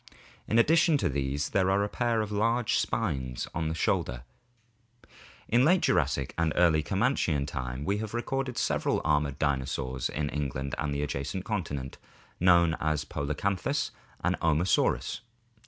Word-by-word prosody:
In 110 - +1
addition 160 +5 +5
to - - 0
these 70 +1 -1
there 95 -1 +2
are 100 +1 +2
a - - 0
pair 115 0 0
of 105 -1 -4
large 115 +3 +1
spines 65 - -2
on 80 -1 -1
the 80 - -2
shoulders. - - 0 1.3
In 120 +2 +4
late 175 +5 +4
Jurassic 70 -1 +1
and 85 -1 +2
early 85 -3 +4
Comanchian 95 - +1
(Wealden) - - -9
time 65 0 -4
we 100 +1 0
have 110 +1 -5
recorded 130 +1 -2
several - - 0
armored 75 -2 +1
dinosaurs 65 -3 -1
in 75 +1 -2
England 70 -2 -3
and 75 -1 -1
the 70 0 -1
adjacent 75 +6 -3
continent, 80 - -4 0.4
known 85 -2 +5
as 75 -1 0
Polacanthus 100 - -1 0.3
and - - +2
Omosaurus. 80 +3 +1
80 Hz, 150 wpm, -28 LUFS, 70-110 Hz, 1.3 s, addition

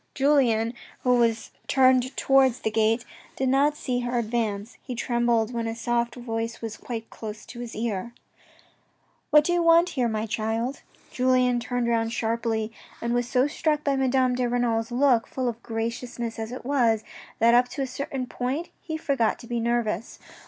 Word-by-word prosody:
Julien, 250 -5 +3 0.3
who 250 -1 +4
was 230 -2 +1 0.2
turned 260 -1 +3
towards 265 -2 +4
the 220 - -1
gate, 225 +2 +2 0.3
did 260 -1 0
not 285 +3 +3
see 250 -4 -1
her 245 0 -2
advance. 220 -2 -2
He 255 - -6
trembled 235 -1 +1
when 230 -1 -2
a 225 - -3
soft 235 0 -1
voice 230 -2 -3
said 225 -2 -6
quite 230 -2 -6
close 215 -1 -7
to 240 - -10
his 240 -1 -6
ear: 225 0 -2 0.6
" - - -40
What 300 0 +7
do 350 - +1
you 350 - +2
want 335 +1 +5
here, 255 -8 0
my 220 -1 -1
child." 225 +3 -2 0.3
Julien 250 -1 +2
turned 245 0 -2
round 230 -1 +1
sharply 225 -1 -1 0.3
and 235 0 -1
was 245 0 0
so 255 -1 +3
struck 300 0 0
by 280 -1 +1
Madame 260 -1 +2
de 250 -1 0
Renal's 235 -2 0
look, 245 -2 +3
full 255 -1 -2
of 235 0 -3
graciousness 230 +1 -4
as 220 +1 -4
it 250 - -7
was, 235 -6 +2 0.3
that 230 +1 +5
up 245 +1 +5
to 275 - -3
a - - 0
certain 260 0 -4
point 260 +7 -3
he 315 -2 -4
forgot 275 -8 +1
to - - -12
be 235 0 -2
nervous. 230 -3 -1
240 Hz, 180 wpm, -26 LUFS, 225-260 Hz, 0.6 s, What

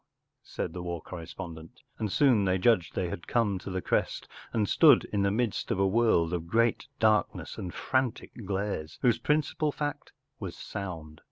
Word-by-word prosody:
” - - -56
said - - -5
the 90 - -5
war 85 -1 -4
correspon¬ 85 0 -8
dent, 80 +1 -13 0.2
and 105 -3 -2
soon 125 -6 +4
they 95 -1 +2
judged 95 -2 +2
they 90 - -1
had 85 - -7
come 105 -5 +1
to 100 - -8
the 95 -1 -3
crest - - -1 0.2
and 105 -3 +1
stood - - +6
in 100 - +2
the 100 - +3
midst 110 +1 -1
of - - 0
a 95 - +3
world 95 -5 +3
of 85 -1 -3
great 115 +6 +1
darkness 110 -1 +1
and 90 - -5
frantic 130 +3 -1 0.2
glares, 95 -5 -3
whose 120 -2 +4
principal 150 +3 +1
fact 145 0 -4 0.3
was - - -6
sound. 80 -6 -7
100 Hz, 185 wpm, -29 LUFS, 90-115 Hz, 0.3 s, stood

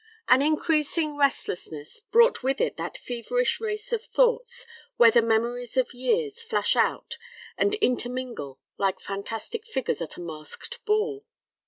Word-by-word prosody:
An 255 +1 +6
increasing 305 0 +1
restlessness 180 - -2
brought 470 +2 +4
with 265 +1 0
it - - 0
that - - -4
feverish - - -1
race 425 +1 -3
of 455 -1 0
thoughts, 485 0 +1 0.3
where 230 -1 +8
the 235 - +5
memories 235 +2 0
of 255 -2 +1
years 430 - -1
flash 455 0 +1
out 470 - 0 0.4
and 405 - +2
intermingle 245 - -2 0.2
like 195 -1 +1
fantastic 225 - -5
figures 265 - -2
at 165 - -5
a - - -7
masked 165 - -6
ball. 425 0 0
285 Hz, 140 wpm, -26 LUFS, -, 0.4 s, where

